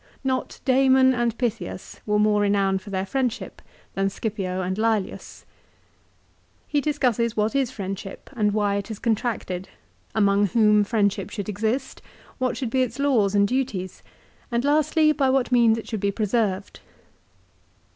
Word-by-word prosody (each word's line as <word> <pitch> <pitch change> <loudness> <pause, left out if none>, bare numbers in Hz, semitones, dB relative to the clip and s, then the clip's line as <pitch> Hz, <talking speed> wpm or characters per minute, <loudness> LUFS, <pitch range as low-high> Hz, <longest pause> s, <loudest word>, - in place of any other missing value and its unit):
Not 260 -1 -2
Damon 260 0 +5
and 240 -2 -1
Pythias 200 - -4
were 210 0 +2
more 210 0 +3
renowned 195 -2 +1
for 205 - -11
their 190 -1 -2
friendship 250 +2 -3 0.3
than 195 0 0
Scipio 195 -3 -3
and 185 +1 -2
Lselius. 215 -2 -2 1.2
He 290 - +1
discusses 240 -6 0
what 215 +1 +1
is 275 -3 +1
friendship, 195 -4 -7
and 210 -3 +2
why 205 -1 +1
it 200 +2 -5
is 220 - -5
contracted; 215 -5 -2 0.5
among 200 -1 +3
whom 210 -1 +4
friendship 205 -1 0
should 205 0 -5
exist; 220 +6 -2 0.4
what 255 -1 0
should 250 -5 -3
be 260 - +2
its 255 0 -2
laws 240 -8 +2
and 200 0 +4
duties, 240 -7 -3 0.5
and 240 +2 0
lastly 305 +1 +3
by 280 -3 +1
what 260 -1 +1
means 235 -2 +4
it 225 - -7
should 220 - -3
be 200 - 0
preserved. 205 -2 -1
220 Hz, 150 wpm, -24 LUFS, 200-255 Hz, 1.2 s, Damon